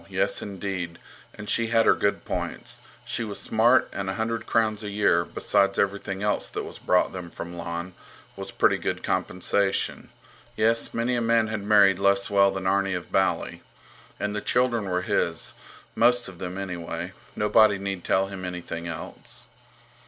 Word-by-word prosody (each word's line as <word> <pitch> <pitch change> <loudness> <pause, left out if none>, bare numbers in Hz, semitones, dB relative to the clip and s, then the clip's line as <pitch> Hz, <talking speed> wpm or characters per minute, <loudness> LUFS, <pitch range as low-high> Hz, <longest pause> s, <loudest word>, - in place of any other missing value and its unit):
Yes, - - 0
indeed! 95 -4 -4 0.4
And 105 - -9
she 115 +2 +2
had 115 0 +3
her - - +7
good 100 - -1
points. - - -4 0.2
She 115 - -2
was 105 -2 -5
smart, 120 +3 +4
and 95 -1 -3
a 95 - -2
hundred 115 0 -2
crowns 110 -2 +1
a 105 - -4
year, 100 -4 +3
besides 100 +3 +1
everything 100 0 -1
else 105 - 0
that - - -4
was - - -9
brought 90 - +2
them 90 -2 -6
from 85 +1 -7
Lon, 85 +1 -5 0.4
was - - -6
pretty - - +2
good - - -3
compensation. 95 +2 0 0.5
Yes, 115 +1 +2
many 120 +2 0
a 120 - 0
man 115 -1 +2
had 110 -1 -3
married 100 -2 +5
less 100 0 +2
well 100 -1 +5
than 95 -1 -4
Arni 95 0 +2
of 90 - -6
Bali. 95 0 0 0.6
And 105 0 -2
the 105 - -2
children 120 -3 +1
were 90 -1 -1
his, - - 0 0.4
most 120 +1 +3
of 95 -3 -10
them, 90 0 -5
anyway. 90 -2 -5 0.2
Nobody 105 0 +4
need 95 -2 -4
tell 95 0 +2
him 95 -1 -7
anything 90 -2 -5
else. 85 - -8
100 Hz, 170 wpm, -26 LUFS, 95-110 Hz, 0.6 s, her